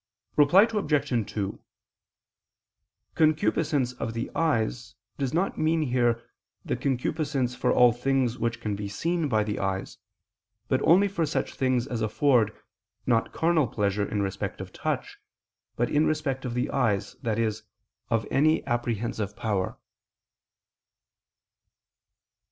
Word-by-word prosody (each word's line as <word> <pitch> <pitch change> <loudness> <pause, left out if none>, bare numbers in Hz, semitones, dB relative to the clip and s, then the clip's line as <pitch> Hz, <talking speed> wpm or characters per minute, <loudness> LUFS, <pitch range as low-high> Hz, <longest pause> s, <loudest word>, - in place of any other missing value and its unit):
Reply 150 +7 +6
Obj. 150 - 0
2: 100 -3 -3 1.5
"Concupiscence 155 -4 +2
of 115 -2 -5
the 115 - -3
eyes" 120 -6 -1 0.2
does 135 -3 -1
not 180 +6 0
mean 160 0 +2
here 120 -3 +1 0.4
the - - -1
concupiscence 135 -1 -1
for 125 - 0
all 125 -1 +6
things 125 0 0
which 115 0 -1
can 105 -3 -2
be 100 0 -4
seen 165 - -1
by 110 -4 +2
the 105 -1 -3
eyes, 95 -1 -3 0.7
but - - +1
only 190 +5 +5
for 175 -5 -1
such 135 - -2
things 130 -2 +1
as 120 -4 -4
afford, 110 0 +3 0.5
not 115 -2 +1
carnal 160 -4 +2
pleasure 100 -1 -1
in 105 -1 0
respect 95 -1 -4
of - - -8
touch, - - -3 0.6
but 120 - +1
in 150 +1 +3
respect 145 -4 -1
of 120 -1 -3
the 125 - -1
eyes, 110 -7 0
i.e. 115 -1 +1 0.6
of 115 -2 +1
any 155 +3 +3
apprehensive 115 -3 -2
power. 100 -4 -2
125 Hz, 130 wpm, -27 LUFS, 110-150 Hz, 1.5 s, Reply